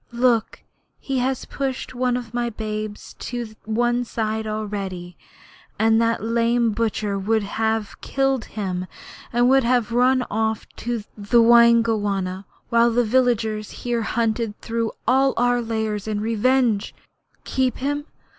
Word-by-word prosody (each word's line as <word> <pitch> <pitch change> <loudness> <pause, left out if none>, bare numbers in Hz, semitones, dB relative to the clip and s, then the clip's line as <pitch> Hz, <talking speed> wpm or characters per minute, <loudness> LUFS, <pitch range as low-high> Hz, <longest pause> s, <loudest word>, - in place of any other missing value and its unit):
Look, 235 -2 +1 0.3
he 270 -2 -2
has 260 +1 -1
pushed 265 -2 -4
one 250 0 0
of 240 -2 -8
my 240 0 0
babes 215 -1 -5
to 235 -3 -5
one 240 +2 +1
side 220 -2 -2
already. 200 -5 -4 0.6
And 225 +1 +4
that 230 -2 +1
lame 230 +1 +2
butcher 210 -2 -1
would 215 +2 +1
have 220 +1 -2
killed 270 -2 0
him 185 -3 -4 0.4
and 240 +1 +3
would 270 +1 +5
have 240 -1 +1
run 250 +1 +3
off 220 0 -1
to 235 -2 -3
the 210 +3 +2
Waingunga 225 -5 +4 0.2
while 235 0 +4
the 240 +1 +2
villagers 220 -3 +1 0.2
here 240 -1 0
hunted 225 -1 -1
through 230 -1 -2 0.2
all 265 +2 +3
our 245 0 +2
lairs 220 -2 -2
in 210 -1 -1
revenge! 225 0 +1 0.5
Keep 260 -2 0
him? 290 +2 -2
230 Hz, 135 wpm, -22 LUFS, 215-245 Hz, 0.6 s, would